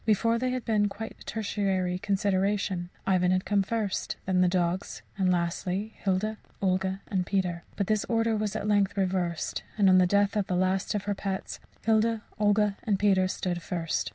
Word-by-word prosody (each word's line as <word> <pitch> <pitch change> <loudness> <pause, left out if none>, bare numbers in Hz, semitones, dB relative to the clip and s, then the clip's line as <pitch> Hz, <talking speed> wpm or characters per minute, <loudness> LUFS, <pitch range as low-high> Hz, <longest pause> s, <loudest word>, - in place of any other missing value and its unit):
Before, 230 +2 +2
they 255 +1 0
had 250 -1 -3
been 210 -3 +2
quite 220 +3 -7
a - - -12
tertiary 195 -4 -1
consideration 195 -2 0 0.2
Ivan 180 -2 +3
had 185 0 +1
come 205 0 +2
first; 210 -1 -2
then 185 -1 +2
the 180 - +5
dogs; 180 +1 -1
and 190 -2 +2
lastly, 180 +4 -1
Hilda, 205 +3 0 0.2
Olga, 190 0 0
and 190 -2 0
Peter. 180 -3 -1
But 200 - 0
this 215 +1 +1
order 225 -1 +1
was 210 -1 -2
at - - -2
length 205 -1 +2
reversed; 180 -3 -1 0.2
and 205 -2 +4
on 185 0 +7
the 180 - +5
death 200 +2 +2
of 205 -2 0
the 180 - 0
last 185 +3 +1
of 205 - -1
her 205 0 -1
pets, 195 -1 -4 0.3
Hilda, 225 0 +2 0.2
Olga 210 -1 +3
and 205 -3 +1
Peter 190 -2 +3
stood 180 -1 -2
first. 165 -1 -2
195 Hz, 185 wpm, -28 LUFS, 185-210 Hz, 0.3 s, on